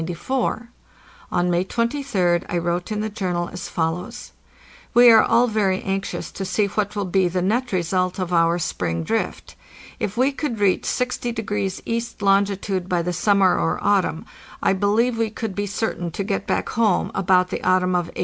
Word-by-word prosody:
On 180 Hz, 0 st, +1 dB
May 175 Hz, +1 st, +2 dB
23d 230 Hz, -6 st, 0 dB
I 175 Hz, -, -1 dB
wrote 175 Hz, +3 st, -2 dB
in 210 Hz, 0 st, -1 dB
the 215 Hz, -, -2 dB
Journal 180 Hz, -4 st, -2 dB
as 180 Hz, -, -6 dB
follows: 165 Hz, +1 st, -3 dB, 0.3 s
'' -, -, -24 dB
We 240 Hz, 0 st, +8 dB
are 220 Hz, -1 st, +8 dB
all 235 Hz, +2 st, +3 dB
very 205 Hz, -5 st, 0 dB
anxious 195 Hz, 0 st, -3 dB
to 195 Hz, -, -5 dB
see 195 Hz, +3 st, +1 dB
what 205 Hz, +1 st, -2 dB
will 205 Hz, -1 st, -1 dB
be 185 Hz, 0 st, +2 dB
the 180 Hz, +1 st, -1 dB
net 240 Hz, +6 st, 0 dB
result 185 Hz, 0 st, 0 dB
of 180 Hz, -2 st, -3 dB
our 170 Hz, 0 st, +3 dB
spring 85 Hz, -, -2 dB
drift. -, -, -3 dB, 0.5 s
If 205 Hz, +3 st, -3 dB
we 260 Hz, +3 st, +3 dB
could 270 Hz, -5 st, -4 dB
reach 200 Hz, -2 st, +2 dB
60° 225 Hz, -6 st, -2 dB
east 230 Hz, -2 st, -3 dB
longitude 195 Hz, -1 st, +1 dB
by 175 Hz, -2 st, +1 dB
the 180 Hz, +1 st, -2 dB
sum 200 Hz, +4 st, +2 dB
mer 185 Hz, -2 st, +4 dB
or 165 Hz, -, 0 dB
autumn, 195 Hz, -5 st, +1 dB, 0.3 s
I -, -, +2 dB
believe 220 Hz, +5 st, +1 dB
we 225 Hz, -1 st, +1 dB
could 215 Hz, -1 st, -5 dB
be 205 Hz, +1 st, -2 dB
certain 200 Hz, -4 st, -2 dB
to 200 Hz, -, -2 dB
get 195 Hz, 0 st, -3 dB
back -, -, -1 dB
home 215 Hz, -5 st, +1 dB
about 185 Hz, -1 st, +2 dB
the -, -, -3 dB
autumn 185 Hz, 0 st, +2 dB
of 175 Hz, -1 st, +1 dB
1896. -, -, -10 dB
195 Hz, 185 wpm, -22 LUFS, 180-215 Hz, 0.5 s, We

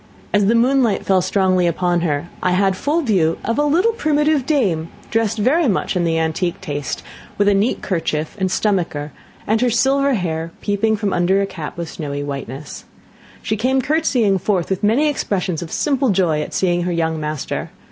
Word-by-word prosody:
As 205 Hz, -1 st, +3 dB
the 230 Hz, -, +3 dB
moonlight 240 Hz, -3 st, +2 dB
fell 190 Hz, -1 st, +3 dB
strongly 185 Hz, -1 st, +2 dB
upon 175 Hz, 0 st, +1 dB
her, 150 Hz, -1 st, -1 dB
I 180 Hz, -, +1 dB
had 190 Hz, +1 st, +2 dB
full 295 Hz, -, 0 dB
view 180 Hz, -, +2 dB
of 230 Hz, +5 st, 0 dB
a -, -, +3 dB
little 345 Hz, +10 st, +3 dB
primitive 300 Hz, -, +1 dB
dame, 185 Hz, -, +1 dB, 0.2 s
dressed 225 Hz, -1 st, +1 dB
very 275 Hz, +9 st, +2 dB
much 195 Hz, -3 st, 0 dB
in 175 Hz, -1 st, +1 dB
the 165 Hz, -1 st, +1 dB
antique 160 Hz, +2 st, -1 dB
taste, 145 Hz, -5 st, -4 dB, 0.3 s
with 205 Hz, -, +2 dB
a 205 Hz, -, +5 dB
neat 200 Hz, +5 st, 0 dB
kerchief 160 Hz, -4 st, -2 dB
and 190 Hz, -1 st, +1 dB
stomacher, 175 Hz, -8 st, -1 dB, 0.3 s
and 220 Hz, +2 st, +1 dB
her 250 Hz, -, +3 dB
silver 270 Hz, +3 st, +2 dB
hair 165 Hz, -3 st, -3 dB
peeping 220 Hz, +2 st, +1 dB
from 205 Hz, -2 st, -1 dB
under 175 Hz, +3 st, +2 dB
a 200 Hz, -, +1 dB
cap 165 Hz, -6 st, -7 dB
of 170 Hz, -1 st, -4 dB
snowy 145 Hz, -3 st, -5 dB
whiteness. 140 Hz, 0 st, -7 dB, 0.6 s
She 215 Hz, -, -1 dB
came 255 Hz, +5 st, +1 dB
curtseying 255 Hz, -8 st, +1 dB
forth, 190 Hz, -1 st, -1 dB
with 190 Hz, 0 st, -1 dB
many 235 Hz, +9 st, +3 dB
expressions 190 Hz, -, -1 dB
of 170 Hz, -, -7 dB
simple 275 Hz, -3 st, +1 dB
joy 175 Hz, -6 st, +2 dB
at -, -, -6 dB
seeing 175 Hz, -2 st, +1 dB
her 180 Hz, +1 st, -1 dB
young 160 Hz, -2 st, -1 dB
master. 150 Hz, -1 st, -4 dB
195 Hz, 190 wpm, -19 LUFS, 170-235 Hz, 0.6 s, a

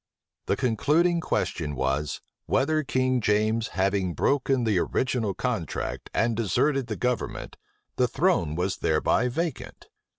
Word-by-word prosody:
The -, -, +2 dB
concluding 155 Hz, +9 st, +2 dB
question 75 Hz, -, -2 dB
was, 70 Hz, +3 st, -1 dB, 0.3 s
"Whether 155 Hz, +4 st, +2 dB
King 130 Hz, -3 st, 0 dB
James 110 Hz, +2 st, +1 dB
having 95 Hz, -2 st, +1 dB
broken 135 Hz, -2 st, +1 dB
the 105 Hz, -5 st, +2 dB
original 115 Hz, -2 st, -1 dB
contract, -, -, -3 dB
and 115 Hz, 0 st, +1 dB
deserted 120 Hz, +5 st, +1 dB
the -, -, -3 dB
government, 125 Hz, -1 st, -3 dB, 0.4 s
the 125 Hz, -, +3 dB
throne 120 Hz, -, +1 dB
was 90 Hz, +2 st, -1 dB
thereby 80 Hz, +9 st, +2 dB
vacant?" 165 Hz, +6 st, -4 dB
115 Hz, 125 wpm, -26 LUFS, 95-135 Hz, 0.4 s, the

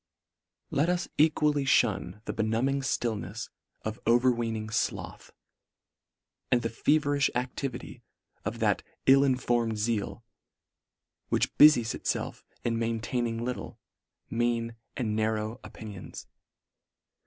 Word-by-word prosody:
Let 150 Hz, +5 st, +2 dB
us 180 Hz, 0 st, 0 dB
equally 150 Hz, -2 st, +3 dB
fhun 105 Hz, -6 st, +1 dB
the -, -, -3 dB
benumbing 115 Hz, +5 st, +1 dB
ftill 120 Hz, -5 st, -1 dB
nefs 105 Hz, +6 st, -6 dB, 0.3 s
of 110 Hz, +1 st, -4 dB
overweening 115 Hz, -2 st, +2 dB
floth, 110 Hz, -, -2 dB, 1.2 s
and 120 Hz, -1 st, +3 dB
the 115 Hz, -, 0 dB
feverilh 145 Hz, +2 st, +2 dB
activity 125 Hz, 0 st, -4 dB, 0.4 s
of -, -, -3 dB
that -, -, +2 dB, 0.2 s
ill 135 Hz, +1 st, +7 dB
informed 120 Hz, -4 st, +1 dB
zeal, 110 Hz, +1 st, -1 dB, 1.1 s
which -, -, +1 dB
bu -, -, +12 dB
ries 120 Hz, -7 st, +5 dB
itfelf -, -, -3 dB, 0.2 s
in 115 Hz, -1 st, 0 dB
maintaining 115 Hz, 0 st, -1 dB
little, 125 Hz, 0 st, -5 dB, 0.5 s
mean, 115 Hz, 0 st, 0 dB, 0.2 s
and 110 Hz, -4 st, -1 dB
narrow 110 Hz, +2 st, -1 dB
opinions. 105 Hz, -4 st, -9 dB
120 Hz, 110 wpm, -29 LUFS, 110-130 Hz, 1.2 s, bu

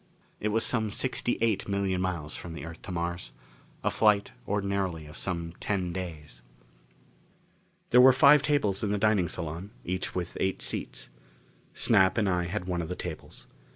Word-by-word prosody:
It 105 Hz, -, -1 dB
was 110 Hz, +2 st, +2 dB
some 110 Hz, -3 st, +2 dB
sixty 120 Hz, +2 st, -1 dB
eight 110 Hz, -4 st, +1 dB
million 100 Hz, -2 st, 0 dB
miles 85 Hz, -5 st, -3 dB
from 85 Hz, -, -7 dB
the 75 Hz, -2 st, -7 dB
Earth 80 Hz, -1 st, -9 dB
to -, -, -8 dB
Mars. 85 Hz, -8 st, -3 dB, 0.5 s
A -, -, +1 dB
flight, 105 Hz, -, +3 dB, 0.2 s
ordinarily, 100 Hz, -5 st, -1 dB
of 75 Hz, +1 st, -12 dB
some 85 Hz, -3 st, -3 dB
ten 95 Hz, -4 st, -1 dB
days. 80 Hz, -9 st, -7 dB, 1.5 s
There 125 Hz, -, +8 dB
were 130 Hz, +1 st, +9 dB
five 130 Hz, +3 st, +7 dB
tables 140 Hz, -11 st, +1 dB
in 100 Hz, -, 0 dB
the 105 Hz, -, +1 dB
dining 100 Hz, -3 st, +3 dB
salon, 85 Hz, +3 st, -4 dB, 0.2 s
each 90 Hz, +1 st, -3 dB
with 90 Hz, -1 st, -3 dB
eight 95 Hz, 0 st, 0 dB
seats. -, -, -4 dB, 0.6 s
Snap 95 Hz, -2 st, +4 dB
and 105 Hz, -3 st, +2 dB
I 90 Hz, -2 st, +1 dB
had 90 Hz, +1 st, -3 dB
one 90 Hz, -2 st, -1 dB
of 80 Hz, -, -5 dB
the 90 Hz, -, -3 dB
tables. -, -, -8 dB
95 Hz, 170 wpm, -28 LUFS, 85-105 Hz, 1.5 s, were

